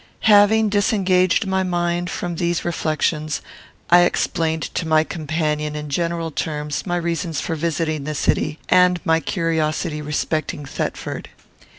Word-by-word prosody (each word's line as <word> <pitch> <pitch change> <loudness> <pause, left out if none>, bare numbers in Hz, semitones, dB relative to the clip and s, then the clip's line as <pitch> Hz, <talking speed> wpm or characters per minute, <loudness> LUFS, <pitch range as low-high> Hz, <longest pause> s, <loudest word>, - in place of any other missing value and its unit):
Having 215 0 +6
disengaged 195 -2 +2
my 190 0 0
mind 175 -1 -1
from 175 0 -4
these 170 0 -1
reflections, 155 -2 -1 0.5
I 175 - +8
explained 160 -2 0
to 165 - -2
my 155 0 +4
companion, 150 -2 -2
in 150 0 -5
general 170 +1 -1
terms, 150 +2 -3
my 175 - 0
reasons 170 -2 -2
for 165 - -3
visiting 155 -2 -1
the 155 0 -3
city, 150 +1 0
and 180 -1 +4
my 160 0 +3
curiosity 160 -2 -1
respecting. 150 0 -2
Thetford. 130 - -4
165 Hz, 130 wpm, -21 LUFS, 155-175 Hz, 0.5 s, I